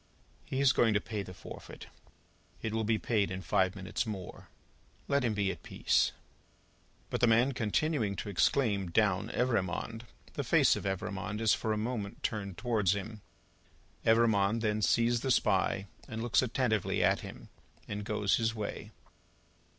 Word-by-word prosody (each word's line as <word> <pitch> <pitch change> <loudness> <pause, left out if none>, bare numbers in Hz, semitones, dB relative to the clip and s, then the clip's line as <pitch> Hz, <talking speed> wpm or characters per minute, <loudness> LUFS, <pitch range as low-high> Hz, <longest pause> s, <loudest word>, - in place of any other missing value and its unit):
"He 130 - -3
is 140 -2 +5
going 115 -3 +3
to - - +4
pay 105 0 -4
the 95 - -8
forfeit: 90 - -10 0.8
it 110 - -2
will 110 0 0
be 110 +1 +2
paid 105 -3 0
in 95 0 -5
five 95 +3 +1
minutes 95 +2 -2
more. 95 -4 -7 0.6
Let 140 -1 +2
him 115 -3 0
be 100 -2 +1
at - - -9
peace." - - +1 1.0
But - - -2
the 120 - +5
man 115 +4 +4
continuing 120 -2 0
to 105 - -5
exclaim, 100 -1 +1
"Down, 100 +2 +2
Evrémonde!" 115 -2 -1 0.3
the - - -2
face - - +4
of - - -5
Evrémonde 95 +2 -3
is 110 -1 +4
for 110 - -1
a 110 - 0
moment 105 -2 -4
turned 100 -4 -3
towards 105 -6 +1
him. 105 +2 -6 0.8
Evrémonde 110 -1 +3
then 110 -1 0
sees 115 +2 +2
the 135 - -2
Spy, 100 -5 +2 0.2
and 110 +1 -5
looks 120 - +3
attentively 120 -4 0
at - - +3
him, - - -10 0.4
and 105 0 -4
goes 105 -2 +1
his 115 0 0
way. 105 -2 -5
110 Hz, 160 wpm, -31 LUFS, 100-115 Hz, 1.0 s, is